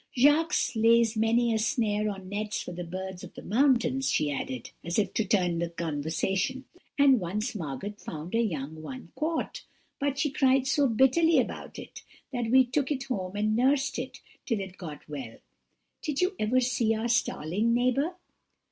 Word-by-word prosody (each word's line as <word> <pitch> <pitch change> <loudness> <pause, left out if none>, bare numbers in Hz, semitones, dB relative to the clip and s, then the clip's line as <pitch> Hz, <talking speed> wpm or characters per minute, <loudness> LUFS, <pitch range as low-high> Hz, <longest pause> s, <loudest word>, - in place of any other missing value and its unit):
Jacques 300 +6 +4 0.2
lays 230 0 +4
many 230 +2 +2
a 220 - +1
snare 215 -3 +1
or 200 - -4
nets 205 +3 -4
for - - -7
the 180 0 -5
birds 185 +1 -6
of - - -11
the - - -9
mountains,' 260 +2 +2
she 150 - +1
added, 130 -3 -4
as 170 +1 -2
if 210 - +1
to 220 - +1
turn 180 -6 +1
the 170 0 -1
conversation; 170 - -2 0.3
'and 275 -3 +6
once 210 +7 -2
Margot 170 - -5
found 160 +4 -7
a 230 - +3
young 155 -7 -3
one 255 +10 -8
caught, 325 +10 -2 0.4
but 280 -1 -1
she 280 0 +1
cried 265 -1 +3
so 275 +1 +3
bitterly 265 +8 +4
about - - -2
it - - -9 0.3
that 240 -3 -1
we 260 +2 +6
took 265 +3 -1
it 275 -3 -1
home 190 -7 -4
and 215 +1 +1
nursed 265 +3 +2
it - - -6 0.3
till 230 -5 0
it 190 -1 -6
got 155 -5 -8
well. 135 -6 -7 0.6
Did 295 -2 -2
you 370 +2 +1
ever 245 +4 +2
see 240 -3 +1
our 220 +2 -2
starling, 225 -2 +1
neighbour?' 255 +8 +1
225 Hz, 175 wpm, -28 LUFS, 185-265 Hz, 0.6 s, and